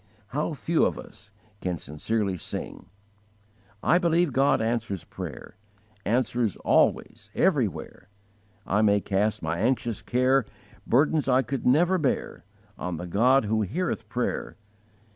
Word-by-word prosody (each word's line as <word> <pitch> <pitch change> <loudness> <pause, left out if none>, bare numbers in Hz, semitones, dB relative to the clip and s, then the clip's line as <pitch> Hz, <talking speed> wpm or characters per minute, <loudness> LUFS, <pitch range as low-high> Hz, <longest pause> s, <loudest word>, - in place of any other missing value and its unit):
How 150 +5 -2
few 160 +4 +1
of - - -4
us 105 - -13 0.3
can 90 -2 -2
sincerely 95 +8 -2
sing: 85 - -6 1.0
I 175 - +4
believe 170 -4 +2
God 135 +2 +3
answers 110 -4 -2
prayer, - - -8 0.5
Answers 120 -1 0
always, - - +1
everywhere; - - 0 0.6
I 105 +2 +1
may 105 -1 +4
cast 100 0 -1
my 80 +2 -2
anxious 120 -4 0
care, 130 +2 +2 0.4
Burdens 145 +3 +2
I 130 0 +4
could 130 +2 -3
never 175 +8 +4
bear, 140 -5 -2 0.4
On 90 -2 -3
the 90 - -5
God 120 +8 +3
who 110 +1 +1
heareth 115 - -2
prayer. 125 0 -2
120 Hz, 125 wpm, -26 LUFS, 105-135 Hz, 1.0 s, I